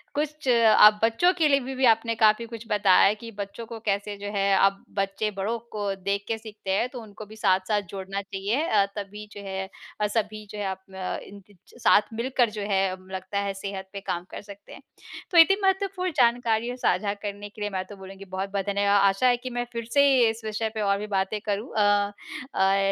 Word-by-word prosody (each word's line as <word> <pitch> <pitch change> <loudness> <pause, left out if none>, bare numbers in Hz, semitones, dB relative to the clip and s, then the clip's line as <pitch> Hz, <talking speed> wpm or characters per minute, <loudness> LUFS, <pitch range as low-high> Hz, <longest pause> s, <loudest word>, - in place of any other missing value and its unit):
कुछ 300 0 -3
आप 220 -3 +6
बच्चों 230 +11 +4
के 315 - +4
लिए 280 -1 +4
बी 265 +1 -6
बी 260 0 +2
आपने 230 0 +3
काफ़ी 220 +1 +3
कुछ 230 0 -9
बताया 205 -3 +4
है 205 +2 +3
कि 230 +2 -10
बच्चों 205 +2 -7
को 225 0 -8
कैसे 205 -1 -2
जो 205 - -7
है 195 0 +1 0.2
अब 195 0 0
बच्चे 195 +2 -1
बड़ों 200 +4 -2
को 205 -2 -2
देख 200 +1 -2
के 225 - -1
सीखते 215 -3 -7
हैं 205 +6 +1
तो 250 -2 -8
उनको 215 0 -11
भी 215 +1 -13
साथ-साथ 200 0 +1
जोड़ना 195 +1 -5
चाहिए 200 +7 -2
अ, 205 -2 +3
तभी 210 +1 -7
जो 205 - -9
है 190 0 -4 0.4
सभी 215 -1 -2
जो 210 - -8
है - - -2
आप 190 0 -3 0.2
अ, 185 -1 -3
इन 200 0 -12
च 205 - -20 0.3
साथ - - +6
मिलकर 240 +1 +1
जो 210 0 -6
है 190 - +3 0.3
लगता 190 +1 -3
है 200 -1 -2
सेहत 195 -1 -6
पे 200 - -5
काम 175 -1 -3
कर - - -7
सकते 200 -1 -13
हैं। - - -12 0.5
तो 345 - +2
इतनी 390 +4 +7
महत्वपूर्ण 385 -1 0
जानकारियाँ 235 -1 +2
साझा 205 -4 +1
करने 205 0 -7
के 210 - -14
लिए 205 - -1
मैं 190 -2 -3
तो 205 - -9
बोलूँगी 195 0 -11
बहुत-बहुत 195 +1 -3
धन्यवाद। 200 0 +2
आशा 195 +6 +1
है 245 -1 +4
कि 255 +1 -7
मैं 245 - -1
फिर 230 -1 -4
से 280 0 +6 0.2
इस 225 +1 -5
विषय 215 +1 -2
पे 215 - -3
और 200 -1 +2
भी 210 - -5
बातें 190 +3 -1
करूँ 205 +4 -2
अ, 205 -1 +3 0.5
और 195 +1 +4
210 Hz, 215 wpm, -26 LUFS, 195-230 Hz, 0.5 s, इतनी